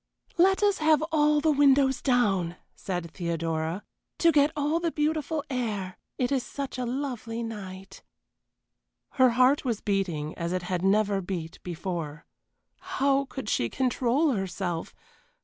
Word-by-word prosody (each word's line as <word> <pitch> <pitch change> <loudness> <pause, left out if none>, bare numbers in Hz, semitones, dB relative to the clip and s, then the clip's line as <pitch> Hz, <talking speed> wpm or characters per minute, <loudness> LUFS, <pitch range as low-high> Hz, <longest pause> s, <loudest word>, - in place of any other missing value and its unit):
"Let 385 +3 +4
us 405 -1 +3
have 310 -1 +4
all 300 -1 +3
the 315 - +3
windows 275 -2 +4
down," 195 -10 +1 0.2
said 175 -3 -4
Theodora, 165 +1 -2 0.3
"to 335 - +5
get 290 -1 +4
all 300 +2 +1
the 335 -1 -1
beautiful 310 0 -1
air 215 -8 -3 0.2
it 250 0 0
is 270 -2 +2
such 275 -2 -5
a 250 - -2
lovely 240 -3 -3
night." 195 -4 -8 1.1
Her 260 -1 +5
heart 255 +3 +4
was 235 -5 -1
beating 175 -7 -1
as 170 +1 -2
it 185 -1 -2
had 180 -1 -2
never 200 0 +2
beat 175 -3 -5
before. 170 -3 -5 0.5
How 280 -7 +1
could 265 -4 -7
she 120 - +1
control 260 - +1
herself! 185 -5 -3
235 Hz, 140 wpm, -27 LUFS, 185-285 Hz, 1.1 s, to